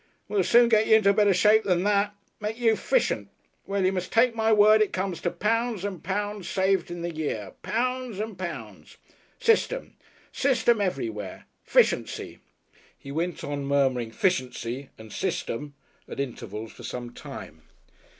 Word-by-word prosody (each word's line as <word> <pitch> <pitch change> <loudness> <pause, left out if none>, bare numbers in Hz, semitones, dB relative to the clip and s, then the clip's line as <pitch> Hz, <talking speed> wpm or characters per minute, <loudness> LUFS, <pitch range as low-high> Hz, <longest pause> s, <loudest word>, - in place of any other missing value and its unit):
We'll 200 -2 +1
soon 240 +5 +6
get 220 -2 +3
y'r 220 - +7
into 200 -2 +4
better 205 -1 +4
shape 210 +4 +5
than 180 -2 +1
that. 205 0 +1 0.2
Make 215 +1 -3
you 230 -2 +3
Fishent. - - 0 0.4
Well, 195 -1 0
y'r 185 +1 +2
must 185 -1 -3
take 230 +1 +4
my 225 -1 +1
word, 215 0 +6
it 215 - +1
comes 185 -2 -2
to 175 - 0
pounds 225 0 -1
and 190 -6 -5
pounds 205 +1 -3
saved 190 0 +1
in 175 -1 -6
the 170 0 -3
year 110 -11 -4
pounds 250 -2 -2
and 215 -1 -4
pounds. 145 - -7 0.4
System! 475 +2 +1 0.4
System 240 -5 +2
everywhere. 110 - -3 0.2
Fishency." - - +1 0.6
He 140 - -10
went 170 +4 -2
on 145 -1 -3
murmuring 130 -4 +1
"Fishency" 130 - -1
and 110 -1 -11
"System" 145 +4 -3 0.3
at - - -8
intervals 115 -5 -5
for - - -14
some 120 -1 -6
time. - - -10
190 Hz, 155 wpm, -26 LUFS, 140-220 Hz, 0.6 s, y'r